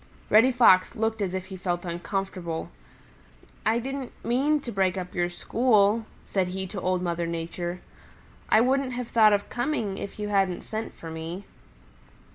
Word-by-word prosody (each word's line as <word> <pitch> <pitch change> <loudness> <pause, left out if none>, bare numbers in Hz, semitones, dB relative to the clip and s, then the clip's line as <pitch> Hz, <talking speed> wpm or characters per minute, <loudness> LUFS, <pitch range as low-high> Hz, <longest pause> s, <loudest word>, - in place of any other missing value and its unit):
Reddy 225 +5 +7
Fox 210 -7 +5
looked 220 0 -1
as 190 -2 -1
if 185 0 -3
he 190 0 -8
felt 175 -1 -2
uncomfortable. 175 -1 -4 1.0
"I 225 +1 +3
didn't 265 +1 -4
mean 280 +6 +2
to 240 - -6
break 190 -2 +1
up 180 -1 -5
your 175 0 0
school," 215 +2 +2 0.2
said 190 -2 0
he 190 +1 -3
to 195 - -4
Old 185 0 0
Mother 170 -1 -1
Nature. 170 +1 -4 0.7
"I 220 - +6
wouldn't 260 +1 +1
have 245 -1 -4
thought 220 -2 +6
of 205 0 +1
coming 240 -6 -1
if 200 - -6
you 210 -1 -3
hadn't 195 -3 +1
sent 220 0 -5
for 165 - -8
me." 165 +4 -6
195 Hz, 165 wpm, -26 LUFS, 180-230 Hz, 1.0 s, Reddy